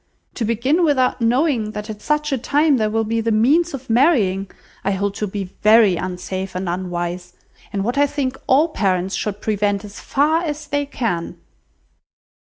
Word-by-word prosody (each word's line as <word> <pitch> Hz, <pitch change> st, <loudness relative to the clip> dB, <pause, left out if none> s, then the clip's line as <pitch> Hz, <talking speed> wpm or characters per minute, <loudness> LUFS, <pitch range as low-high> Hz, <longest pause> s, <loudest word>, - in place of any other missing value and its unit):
To 230 Hz, -, -2 dB
begin 255 Hz, +10 st, +1 dB
without 260 Hz, -5 st, +2 dB
knowing 235 Hz, -2 st, +1 dB
that 210 Hz, 0 st, -5 dB
at 215 Hz, -2 st, -7 dB
such 300 Hz, +2 st, 0 dB
a 270 Hz, -, +1 dB
time 290 Hz, +3 st, +2 dB
there 215 Hz, -2 st, +1 dB
will 225 Hz, +1 st, 0 dB
be 225 Hz, +1 st, -1 dB
the 225 Hz, 0 st, 0 dB
means 285 Hz, +10 st, +3 dB
of 265 Hz, -1 st, -10 dB
marrying, 225 Hz, -, +2 dB, 0.3 s
I 195 Hz, -, 0 dB
hold 200 Hz, +1 st, -1 dB
to 210 Hz, -, -2 dB
be 195 Hz, -1 st, -5 dB
very 215 Hz, -3 st, +6 dB
unsafe 185 Hz, +2 st, -5 dB
and 185 Hz, 0 st, -3 dB
unwise, 175 Hz, 0 st, -4 dB, 0.4 s
and 195 Hz, -1 st, -2 dB
what 240 Hz, +6 st, -1 dB
I 285 Hz, -, +4 dB
think 275 Hz, -2 st, -2 dB
all 295 Hz, +6 st, +4 dB
parents 190 Hz, -, 0 dB
should 205 Hz, +2 st, -3 dB
prevent 205 Hz, -1 st, 0 dB
as 205 Hz, 0 st, -10 dB
far 305 Hz, +4 st, +1 dB
as 300 Hz, -2 st, -4 dB
they 285 Hz, 0 st, -2 dB
can." 225 Hz, -, -3 dB
220 Hz, 175 wpm, -20 LUFS, 195-280 Hz, 0.4 s, very